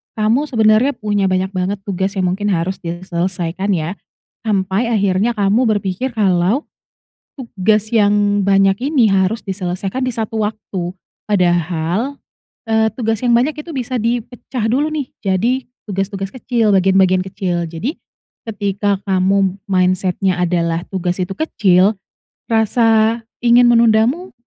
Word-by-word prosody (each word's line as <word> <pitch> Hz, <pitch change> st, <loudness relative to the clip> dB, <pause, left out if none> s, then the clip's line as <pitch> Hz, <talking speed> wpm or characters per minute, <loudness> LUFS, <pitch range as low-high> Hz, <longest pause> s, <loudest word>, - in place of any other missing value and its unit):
Kamu 225 Hz, +7 st, +1 dB
sebenernya 225 Hz, +2 st, +3 dB
punya 205 Hz, -3 st, 0 dB
banyak 185 Hz, 0 st, 0 dB
banget 190 Hz, +1 st, -2 dB
tugas 195 Hz, 0 st, -2 dB
yang 185 Hz, -2 st, +1 dB
mungkin 205 Hz, +2 st, -2 dB
harus 180 Hz, +3 st, -2 dB
diselesaikan, 175 Hz, +2 st, -3 dB
ya, 170 Hz, +4 st, -3 dB, 0.5 s
sampai 200 Hz, +2 st, 0 dB
akhirnya 205 Hz, 0 st, +1 dB
kamu 210 Hz, +4 st, +2 dB
berpikir 205 Hz, +6 st, -3 dB
kalau 195 Hz, -, +2 dB, 0.8 s
tugas 215 Hz, -3 st, 0 dB
yang 205 Hz, -1 st, +3 dB
banyak 195 Hz, +5 st, +3 dB
ini 245 Hz, -9 st, +3 dB
harus 195 Hz, +4 st, +1 dB
diselesaikan 190 Hz, +3 st, -4 dB
di 255 Hz, -, 0 dB
satu 225 Hz, -1 st, -3 dB
waktu, 210 Hz, -3 st, -5 dB, 0.5 s
padahal, 175 Hz, -, 0 dB, 0.5 s
eee, 220 Hz, 0 st, +2 dB
tugas 225 Hz, -3 st, -1 dB
yang 240 Hz, -1 st, +3 dB
banyak 260 Hz, +6 st, +2 dB
itu 300 Hz, +3 st, -7 dB
bisa 255 Hz, -1 st, -2 dB
dipecah 240 Hz, +1 st, -3 dB
dulu, 280 Hz, +6 st, +1 dB
nih, 295 Hz, -4 st, -4 dB
jadi 225 Hz, +7 st, 0 dB, 0.2 s
tugas-tugas 195 Hz, 0 st, -3 dB
kecil, 240 Hz, -3 st, 0 dB
bagian-bagian 190 Hz, -1 st, +3 dB
kecil. 180 Hz, -3 st, -2 dB
Jadi 170 Hz, -, -4 dB, 0.5 s
ketika 205 Hz, -2 st, -1 dB
kamu 190 Hz, 0 st, +2 dB
mindset-nya 185 Hz, 0 st, +1 dB
adalah 170 Hz, -1 st, 0 dB
tugas 180 Hz, -1 st, -1 dB
itu 180 Hz, +1 st, -2 dB
kecil, 200 Hz, -, +2 dB, 0.5 s
rasa 225 Hz, 0 st, +2 dB, 0.2 s
ingin 240 Hz, 0 st, +5 dB
menundamu 235 Hz, +9 st, +3 dB
205 Hz, 125 wpm, -17 LUFS, 185-230 Hz, 0.8 s, ingin